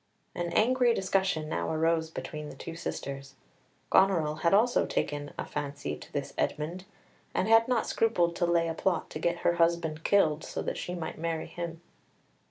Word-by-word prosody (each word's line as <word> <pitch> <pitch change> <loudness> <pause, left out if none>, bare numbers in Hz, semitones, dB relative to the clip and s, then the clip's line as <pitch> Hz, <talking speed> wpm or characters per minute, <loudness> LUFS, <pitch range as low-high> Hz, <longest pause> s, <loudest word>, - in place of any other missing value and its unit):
An 175 -1 -3
angry 245 +1 +4
discussion 190 -4 0
now 155 - -2
arose 160 0 +1
between 150 -2 -6
the - - -10
two 165 - -7
sisters. 135 -4 -5 0.6
Goneril 160 -6 +3
also 210 +8 +4
had - - -2
taken 145 0 -2
a - - -3
fancy 140 - -4
to - - -13
this - - -3
Edmund, 170 +5 -2 0.5
and - - +1
had 225 +1 +6
not 250 -3 +1
scrupled 175 -7 +1
to 175 - +1
lay 170 -1 +2
a 165 - -1
plot 175 +2 -1
to 155 - -5
get 170 +1 0
her 170 - +3
husband 165 -2 +1
killed, 160 -6 +3
so - - -4
that - - -3
she 180 - -4
might 165 -2 -5
marry 165 -1 -2
him. 170 -1 -6
170 Hz, 180 wpm, -29 LUFS, 155-190 Hz, 0.6 s, had